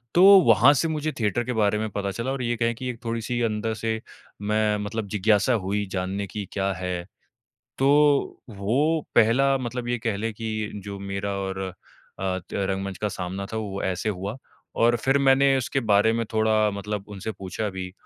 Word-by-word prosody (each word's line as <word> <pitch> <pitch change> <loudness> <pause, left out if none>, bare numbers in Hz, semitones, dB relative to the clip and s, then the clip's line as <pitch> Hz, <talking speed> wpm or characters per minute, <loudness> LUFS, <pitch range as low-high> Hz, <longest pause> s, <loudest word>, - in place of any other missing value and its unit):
तो 180 - +6 0.2
वहाँ 115 +6 +7
से 165 - +1
मुझे 155 0 -2
थिएटर 115 +2 +1
के 125 - -3
बारे 105 -1 +2
में 110 0 -2
पता 100 0 -3
चला 115 +6 -3
और 135 - -3
ये 120 0 0
कहें 115 0 +1
कि 130 +2 -5
एक 120 0 -7
थोड़ी-सी 115 +1 -2
अंदर 110 -1 -1
से 110 0 -2 0.4
मैं 105 0 +1
मतलब 105 +1 -4
जिज्ञासा 105 +4 +2
हुई 105 +1 -1
जानने 95 +1 -2
की, 105 0 -5
क्या 100 -1 -1
है। 90 -1 -4 0.7
तो 135 - +2 0.6
वो 125 +11 +1
पहला 135 +5 +4
मतलब 125 -1 -4
ये 120 0 0
कह 110 -2 -2
लें 110 +2 -2
कि 110 -1 -3
जो 100 -1 -6
मेरा 100 0 -4
और 95 0 -3 0.6
अ, 95 -1 -1
त 90 - -13
रंगमंच 95 -1 -2
का 105 - -1
सामना 95 +1 -4
था, - - -2
वो 100 -3 -4
ऐसे 95 +3 -1
हुआ। 100 +4 -3 0.5
और 120 +1 +5
फिर 135 +1 +3
मैंने 135 0 +4
उसके 135 +2 -1
बारे 105 +3 +5
में 115 0 0
थोड़ा 110 -1 +3
मतलब 100 0 -5
उनसे 100 +2 -5
पूछा 100 +2 -4
भी 95 -1 -6
110 Hz, 190 wpm, -25 LUFS, 100-120 Hz, 0.7 s, वहाँ